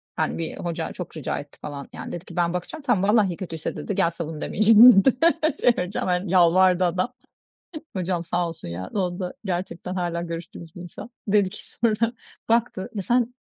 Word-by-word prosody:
Hani, - - -1
bir 165 -1 -4
hoca 170 -1 -3
çok 180 -2 -8
rica 155 - -3
etti 145 0 -12
falan, 140 -2 -7
yani, - - -7
dedi 175 +1 -7
ki: - - -11
"Ben 175 -1 +1
bakacağım. 180 - -5
Tamam, 205 -7 +2
vallahi 195 -6 +3
kötüyse" 165 -5 -5
dedi, 200 - -4
"gel 170 - +3
savun 160 -2 -6
demeyeceğim." 220 -1 +7
dedi 265 - +4 0.4
şey 245 - +5
vereceğim. 180 +2 -2
Hani, 180 0 0
yalvardı 185 +1 +5
adam. 185 +8 -1 0.8
Hocam 175 -1 -1
sağ 175 +1 -1
olsun 165 - -8
ya, 85 +2 -6
onda 180 -2 -2
gerçekten 180 -1 -4
hâlâ 175 -2 -2
görüştüğümüz 170 -1 -8
bir - - -8
insan. 180 +6 -9 0.2
Dedi 200 -2 +3
ki - - -11
sonra, 230 0 +1 0.4
baktı, 230 -4 +1
"Ya, 200 - -2
sen 245 +3 +1
180 Hz, 185 wpm, -24 LUFS, 170-205 Hz, 0.8 s, demeyeceğim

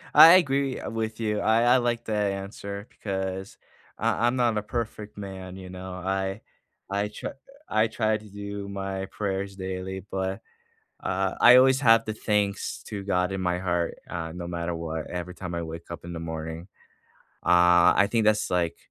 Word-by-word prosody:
I 165 +1 +11
agree, 140 -6 +3
uh, - - -5
with 110 0 -3
you. 105 -2 0
I 110 +3 +3
I 125 +2 +6
like 120 -1 -1
that 105 -2 0
answer 100 +1 -6
because 95 -1 -4 0.4
I 120 - +1
I'm 125 - +1
not 120 -3 +2
a - - +1
perfect 105 -1 -5
man, 95 -2 -7
you 95 -1 -9
know. 95 0 -7
I 95 +1 -2 0.5
I 100 +1 0
tr 105 - -7 0.4
I 110 +1 +2
try 110 -1 0
to 105 -1 -14
do 100 0 -6
my 95 -1 -4
prayers 100 -1 -3
daily, 95 0 -5
but, 95 +2 -2 0.6
uh, 95 +1 0
I 125 +1 +9
always 130 +1 +6
have 115 -3 +6
the 110 - -2
thanks 105 -2 -1
to 100 -2 -5
God 90 -1 0
in 95 - -3
my 90 -1 0
heart, 85 -2 -1
uh, 80 -2 -4
no 85 0 -6
matter 85 0 -3
what, 80 -1 -4
every 90 0 -5
time 90 -2 -6
I 85 - -2
wake 80 +1 -8
up 85 - -7
in 85 - -6
the 85 - -5
morning. 80 +2 -6 0.8
Uh, 90 0 +6
I 100 - +4
think 115 -2 +2
that's, 110 0 +3
like, 85 -2 +1
95 Hz, 185 wpm, -26 LUFS, 90-110 Hz, 0.8 s, I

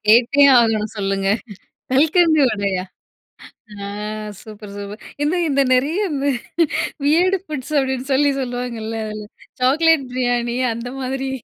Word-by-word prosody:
கேட்டே 240 +6 +5 0.2
ஆகணும் 220 -2 +1
சொல்லுங்க. 195 -1 -1 0.6
கல்கண்டு 315 +3 +4
வடையா? 200 -4 -1 1.0
ஆ - - -5 0.6
சூப்பர், 210 -2 -11
சூப்பர். 205 +1 -8 0.2
எந்த 300 +4 +1
இந்த 280 -1 +2
நிறைய 280 +7 +1 0.2
இந்த 280 0 -1 0.8
வியர்டு 355 +6 +3
ஃபுட்ஸ் 300 -4 -6
அப்பிடின்னு 265 0 -1
சொல்லி 285 +2 +3
சொல்லுவாங்கல்ல 245 -3 -4
அதில. 215 0 -6 0.4
சாக்லேட் 300 +3 +3
பிரியாணி 245 -1 0 0.2
அந்த 235 +2 -6
மாதிரி. 265 +1 -3
255 Hz, 115 wpm, -20 LUFS, 220-285 Hz, 1.0 s, கேட்டே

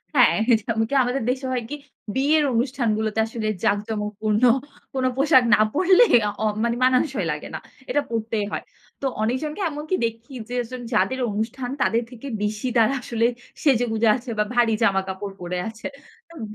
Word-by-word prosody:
হ্যাঁ, 250 - +6 0.3
যেমন 225 +1 -1
কি - - -5
আমাদের 245 0 -1
দেশে 260 +1 -1
হয় 250 -2 -1
কি? 295 - -4 0.4
বিয়ের 295 +3 +3
অনুষ্ঠানগুলোতে 225 -3 0
আসলে 220 -1 -4 0.2
জাকজমকপূর্ণ 210 +1 -1 0.5
কোন 260 -1 -1
পোশাক 270 -2 +5
না - - +5
পরলে 370 +8 +5 0.4
অ - - 0 0.2
মানে 235 0 +1
মানানসই 255 - +2
লাগে 150 - -5
না। - - -4 0.3
এটা 290 - +2
পরতেই 220 -2 -2
হয়। - - -3 0.4
তো 275 - -3 0.2
অনেকজনকে 260 - -2
এমনকি 300 +5 -3
দেখি 230 +3 -6 0.2
যে, 245 - -4
যেজন 245 +1 -5
যাদের 260 +4 +1
অনুষ্ঠান 240 +4 -3
তাদের 230 +1 +2
থেকে 250 +3 -9 0.2
বেশি 210 +3 -2
তারা 225 +4 +4
আসলে 230 -1 0 0.4
সেজেগুজে 235 -5 +2
আছে 250 0 -7
বা - - +5
ভারী 235 -2 +3
জামাকাপড় 195 -1 0
পরে 175 +1 -3
আছে। 220 0 -6 0.4
হুম। 320 -9 -7
235 Hz, 160 wpm, -23 LUFS, 215-260 Hz, 0.5 s, হ্যাঁ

